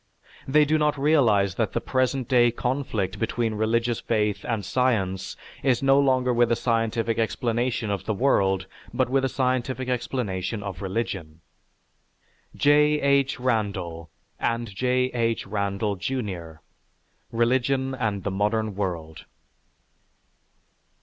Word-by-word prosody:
They 150 +2 +5
do 155 +2 +2
not 150 -1 +1
realize 120 -10 +3
that - - -1
the - - +1
present 130 0 0
day 120 -2 +5
conflict 115 -6 -2
between 115 0 -1
religious 115 +2 0
faith 105 -2 0
and 110 -5 -2
science 100 -7 0 0.2
is 130 -1 +1
no 135 +1 +5
longer 130 -2 +2
with 120 0 +3
a - - +4
scientific 115 -1 0
explanation 115 0 -1
of 100 - -3
the 110 - 0
world, 95 -6 +2 0.3
but 125 +1 0
with 135 0 +2
a 135 - +1
scientific 130 0 -1
explanation 110 -5 -2
of 95 -3 -6
religion." 90 -6 -4 1.2
(_J. 150 +1 +4
H. 140 -1 +2
Randall 100 -9 -2 0.3
and 115 -2 -1
J. 125 +4 +1
H. 115 -1 0
Randall, 100 0 -2
Jr.: 95 -8 -4 0.8
"Religion 130 +3 +1
and 105 -7 -2
the 100 - -2
Modern 105 +2 0
World." 85 -5 -4
115 Hz, 125 wpm, -25 LUFS, 100-130 Hz, 1.2 s, They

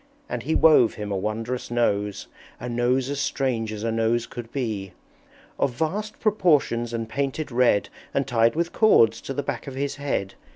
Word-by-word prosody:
And - - -4
he 160 - -1
wove 150 -8 +5
him 105 -1 -5
a - - 0
wondrous 110 +5 -3
Nose, 105 -4 0 0.3
A 125 - -5
Nose 125 +2 +1
as 145 - -3
strange 125 -6 -1
as 105 0 -6
a 115 - 0
Nose 115 +1 +1
could 115 -1 -9
be! 110 -8 -3 0.7
Of 135 - +1
vast 205 - -2
proportions 150 - +2
and 115 -1 -3
painted 140 +4 -3
red, 120 -4 +3 0.2
And 140 - 0
tied 115 -2 +2
with 170 +1 -1
cords 115 - +4
to - - -6
the 145 - -1
back 135 -3 -4
of 135 - -6
his 140 +1 -2
head. 135 -9 -2
120 Hz, 180 wpm, -24 LUFS, 115-140 Hz, 0.7 s, wove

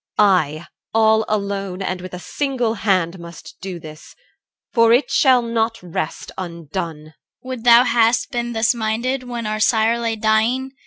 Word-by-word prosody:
I, 170 -6 +2 0.3
all 220 0 +4
alone 200 -2 -3
and 185 -1 -3
with 185 0 -8
a - - -7
single 245 - -2
hand, 185 -5 0
Must 170 -2 -11
do 190 -3 -6
this. 155 -1 -12 0.6
For 230 -1 +4
it 250 +4 +2
shall 260 -5 +4
not 230 0 -1
rest 165 -2 -5
undone. 170 -2 -6
CHR. 155 - -17 0.3
Would 255 -3 -5
thou 240 0 +8
hadst 235 +2 +2
been 240 -1 -3
thus 225 +2 +2
minded 235 +3 -1
when 240 -2 -6
our 215 0 -2
sire 225 +1 +2
Lay 230 -1 -1
dying! 220 +5 +1
220 Hz, 160 wpm, -20 LUFS, 180-235 Hz, 0.6 s, thou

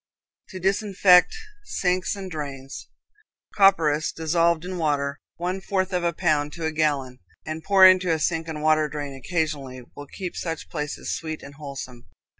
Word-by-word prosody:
To 185 - -8
Disinfect 195 - +4 0.3
Sinks 185 - -1
and 190 -2 -7
Drains. 140 -3 -7 0.6
Copperas 160 -7 +3
dissolved 165 +1 +1
in 185 -1 -5
water, 145 -2 -1 0.2
one 180 +2 -3
fourth 190 -1 -1
of 180 -1 0
a 170 - +2
pound 150 -2 0
to 165 -2 -5
a 160 - 0
gallon, 145 -5 -1 0.3
and 155 +1 -5
poured 190 -2 +8
into 185 -2 0
a 160 - +2
sink 165 +1 -1
and 155 -2 -5
water 155 -1 +3
drain 145 -2 -5
occasionally, 140 -4 -3
will 145 - -9
keep 185 +2 -6
such 165 -2 -5
places 150 -2 -4
sweet 155 -1 -6
and 140 - -10
wholesome. 135 -4 -9
160 Hz, 160 wpm, -24 LUFS, 145-180 Hz, 0.6 s, poured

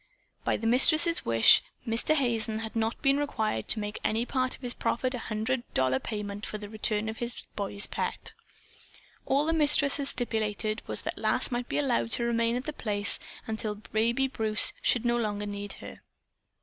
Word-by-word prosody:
By - - +1
the 225 - -6
Mistress's 310 +8 +4
wish, 115 -1 +6 0.3
Mr. 230 +7 +2
Hazen 230 -5 +2
had 220 +1 -6
not 225 0 -1
been 275 0 +3
required 220 - -2
to - - +3
make 210 0 -5
any 225 +2 0
part 255 0 -1
of - - -19
his 245 -1 -2
proffered 255 +2 -1
hundred 230 +1 -2
dollar 130 0 +2
payment 205 +1 -5
for 215 - -4
the 205 -1 -9
return 215 0 -1
of 220 0 -5
his 240 0 -4
boy's 200 0 0
pet. - - -4 0.9
All 280 +2 +2
the 325 - +1
Mistress 295 -2 +6
had 280 -2 -3
stipulated 215 -3 -2
was - - -1
that - - -4
Lass - - 0
might 245 0 -3
be - - -1
allowed 255 -5 +1
to 235 - +1
remain 230 0 +1
at 250 - -3
The 305 - -5
Place 205 -5 0 0.3
until 220 -1 -2
baby 230 +5 0
Bruce 220 -4 0
should 240 -1 +1
no 240 0 +2
longer 210 -3 -2
need 205 0 -5
her. - - -11
225 Hz, 185 wpm, -28 LUFS, 215-255 Hz, 0.9 s, wish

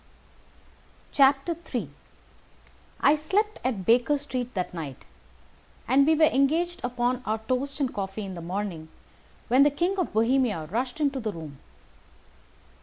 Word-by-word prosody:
III 275 - +2 1.1
I 285 - +6
slept 395 +8 0
at 225 -8 -2
Baker 245 +6 +4
Street 255 -3 -4
that 180 -1 -2
night, 150 -6 -7 0.8
and 275 +3 +4
we 320 - +5
were 315 - +3
engaged 320 +6 +1
upon 245 0 -1
our 220 -2 -1
toast 255 +6 -3
and 270 -3 -1
coffee 200 +1 -4
in 190 - -6
the 170 - -7
morning, 175 -2 -4 0.6
when 255 +3 +4
the 290 - +7
King 350 +7 -1
of 365 - -1
Bohemia 225 -7 +1
rushed 250 +6 -2
into 280 -3 +1
the 220 -3 -2
room. 155 -6 -9
255 Hz, 135 wpm, -26 LUFS, 205-285 Hz, 1.1 s, the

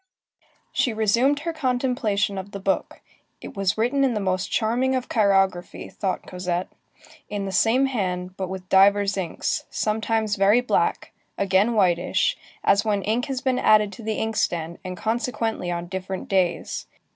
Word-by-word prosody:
She 245 - +1
resumed 235 +7 +2
her 335 +1 -3
contemplation 245 -8 0
of 195 +2 -9
the 200 - -5
book. 190 0 -2 0.4
It - - -10
was 195 0 0
written 250 +5 +1
in 255 -4 +2
the - - 0
most 185 -1 -1
charming 245 +4 +1
of 255 -1 -2
chirography, 195 -4 +1
thought 190 -2 -3
Cosette; 180 0 -3 0.6
in 205 -1 -3
the 195 - -4
same 225 +8 +3
hand, 185 -7 -2
but 190 -2 -4
with 185 -1 -7
divers 200 +1 +4
inks, 185 -4 -2
sometimes 220 0 0
very 200 +4 +5
black, 245 - 0 0.3
again 200 +4 +2
whitish, 185 - +2 0.3
as 200 +1 +4
when 205 -3 0
ink 225 +4 0
has 265 -2 -3
been 260 -1 +1
added 210 -1 +4
to - - -10
the 220 -1 -2
inkstand, 170 -7 -1
and 185 -1 -6
consequently 225 -2 -2
on 170 0 -3
different 190 +1 -5
days. 185 -3 -1
205 Hz, 155 wpm, -24 LUFS, 190-235 Hz, 0.6 s, very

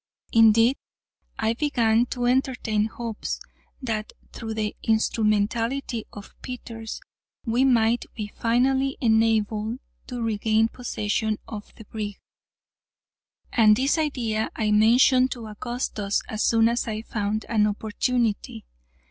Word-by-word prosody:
Indeed, 225 +3 +5 0.6
I 220 +1 +1
began 235 -4 +2
to 245 -1 -3
entertain 245 -4 +1
hopes, 225 0 -5 0.4
that 220 -3 -3 0.2
through 225 -2 -5
the 215 -1 -2
instrumentality 225 +3 0
of 205 0 -11
Peters 230 -3 -7 0.4
we 240 +3 +2
might 235 -2 +3
be 215 - -3
finally 265 +5 +1
enabled 220 -1 +1 0.3
to 245 -2 -4
regain 220 0 +1
possession 220 -3 -2
of 210 -2 -8
the 220 - -13
brig, 210 -1 -5 1.4
and 215 -2 +6
this 270 +7 +1
idea 235 -8 -1
I 215 -2 0
mentioned 245 +4 +5
to 235 -2 -9
Augustus 215 -2 -3
as 215 0 -4
soon 225 -1 +4
as 235 +1 0
I 220 0 -3
found 215 -1 -2
an 215 -2 +2
opportunity. 220 +2 -1
225 Hz, 115 wpm, -25 LUFS, 215-245 Hz, 1.4 s, and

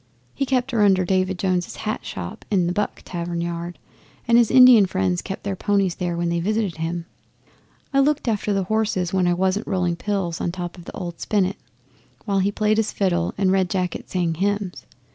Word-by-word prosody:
He 275 - -2
kept 255 0 0
her 230 -3 +1
under 190 -3 +4
David 185 0 +1
Jones's 180 -1 -1
hat 215 0 -4
shop 90 -2 -7
in 190 -4 +2
the 175 - 0
"Buck" 205 +2 -2
tavern 170 -1 -4
yard, 170 0 -4 0.5
and 235 - +4
his 235 -2 +5
Indian 250 -6 +8
friends 95 - 0
kept 190 - -6
their 200 -1 -2
ponies 200 -2 +1
there 175 -1 -3
when 170 0 0
they 170 0 0
visited 205 -1 -1
him. 165 +1 -3 0.9
I 275 - +4
looked 290 0 +2
after 210 -2 0
the 195 -1 +1
horses 195 -3 -1
when 185 -2 +2
I 175 - +2
wasn't 190 +3 0
rolling 180 -3 0
pills 190 -4 -2
on 170 - -1
top 175 -1 -6
of 175 -2 -13
the - - -8
old 175 -2 -6
spinet, 200 -2 0 0.7
while 200 -2 +1
he 195 +2 +1
played 215 +1 +1
his 220 -1 +1
fiddle 175 -3 0
and 190 -1 +2
Red 190 -1 +2
Jacket 180 -2 -3
sang 175 -3 0
hymns. 200 +2 -2
190 Hz, 200 wpm, -22 LUFS, 175-210 Hz, 0.9 s, Indian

